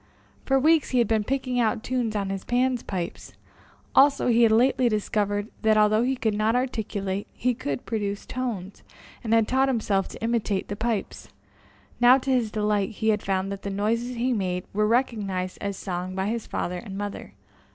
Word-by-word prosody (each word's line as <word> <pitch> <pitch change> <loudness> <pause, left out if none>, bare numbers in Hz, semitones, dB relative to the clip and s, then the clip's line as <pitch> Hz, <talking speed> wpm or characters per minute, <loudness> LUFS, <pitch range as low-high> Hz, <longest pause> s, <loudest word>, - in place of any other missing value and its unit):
For 270 - +3
weeks 310 +2 +3
he 255 - 0
had 235 -3 +3
been 220 -1 +1
picking 255 +1 -1
out 225 -1 +1
tunes 245 -4 -1
on 200 -2 -1
his 195 -1 -4
Pan's 250 0 +1
pipes, 180 -3 -5 0.6
also, 275 -2 +5
he 235 0 +4
had 230 -2 +6
lately 250 +2 +3
discovered 205 -1 -1
that, 220 0 +3
although 215 +1 +4
he 260 +2 +1
could 225 -4 0
not 215 +2 +1
articulate, 205 -6 -2
he 250 +1 0
could 145 - -4
produce 205 -3 -3
tones, 220 -7 -5 0.4
and 225 - -3
had 225 -1 +4
taught 265 +1 +2
himself 205 -6 0
to - - -10
imitate 225 -4 -1
the 205 - -3
pipes. 220 0 -3 0.7
Now, 245 +2 +7
to 270 0 -2
his 245 -4 +2
delight, 210 -2 0
he 220 +1 -1
had 210 -1 +2
found 195 0 -1
that 200 0 -5
the 200 - -4
noises 230 +5 -1
he 245 +2 0
made 180 -4 -1
were 210 +1 +2
recognized 205 -6 -1
as 200 -1 -3
song 185 0 -4
by 190 +1 -1
his 230 0 -3
father 180 +1 -3
and 195 -3 -8
mother. 205 0 -6
220 Hz, 190 wpm, -25 LUFS, 200-245 Hz, 0.7 s, Now